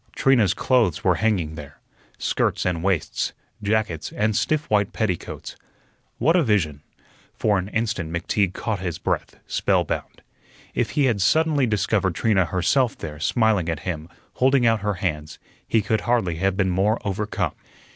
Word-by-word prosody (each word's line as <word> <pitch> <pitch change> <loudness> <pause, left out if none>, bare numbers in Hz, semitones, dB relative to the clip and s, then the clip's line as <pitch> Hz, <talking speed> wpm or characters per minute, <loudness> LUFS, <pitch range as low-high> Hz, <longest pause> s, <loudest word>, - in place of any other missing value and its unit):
Trina's 115 -9 +3
clothes 115 - +2
were - - +4
hanging 95 -9 +1
there 75 -2 -10 0.4
skirts - - 0
and 90 -3 0
waists, 95 -5 0 0.3
jackets, 105 -6 -1
and 105 0 0
stiff 155 +6 0
white 105 -2 +1
petticoats. 100 -7 -3 0.6
What 160 +8 +3
a 180 - +5
vision! 90 - +1 0.5
For 105 -3 +2
an 90 - -4
instant 110 -7 -2
McTeague 90 +2 0
caught 110 -4 -2
his 90 -3 -3
breath, - - -2
spellbound. - - -1 0.5
If - - 0
he 145 - +4
had 115 -6 +1
suddenly 150 - +3
discovered 100 -4 +1
Trina 95 0 +2
herself 115 +9 +1
there, 75 -2 -7
smiling 110 - +2
at 80 -2 -3
him, 80 -3 -4 0.2
holding 130 -1 +3
out 115 -1 +3
her 105 0 -1
hands, 75 -4 -3 0.3
he 110 -2 +2
could 110 +1 0
hardly 110 -9 0
have 95 +2 0
been 95 -2 +2
more 100 +5 +2
overcome. 105 +1 -2
100 Hz, 155 wpm, -23 LUFS, 90-110 Hz, 0.6 s, a